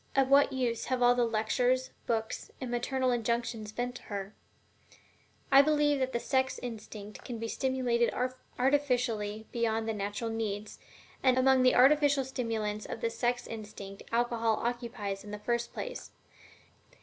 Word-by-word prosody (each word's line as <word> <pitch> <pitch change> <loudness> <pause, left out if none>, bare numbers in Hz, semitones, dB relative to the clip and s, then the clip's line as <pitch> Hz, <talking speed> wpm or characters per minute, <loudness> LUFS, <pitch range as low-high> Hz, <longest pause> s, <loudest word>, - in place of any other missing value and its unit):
Of 270 -1 +3
what 280 +1 +6
use 245 -3 -1
have 255 -1 0
all 245 0 +7
the 245 -1 +2
lectures, 245 +3 +1 0.2
books, 225 -1 -2
and 255 -2 -4
maternal 255 +1 0
injunctions 235 -2 -1
been 245 +2 -3
to 250 - -10
her? 200 0 -5 1.2
I 275 0 +9
believe 295 -1 +3
that 260 0 0
the 235 - -1
sex 260 +1 0
instinct 215 -3 -8
can 240 - -5
be 225 0 -4
stimulated 245 -1 +1 0.5
artificially 245 -6 +1
beyond 225 -1 0
the 225 - 0
natural 205 +2 -3
needs, 215 -2 -4 0.4
and 255 -1 +4
among 260 0 +5
the 255 0 +5
artificial 285 +1 +5
stimulants 220 -5 -3
of - - -6
the 230 - 0
sex 245 +1 -1
instinct 205 -3 -8
alcohol 230 -1 +1
occupies 230 -5 -3
the 210 0 -7
first 235 +3 -1
place. - - -6
240 Hz, 150 wpm, -31 LUFS, 220-255 Hz, 1.2 s, I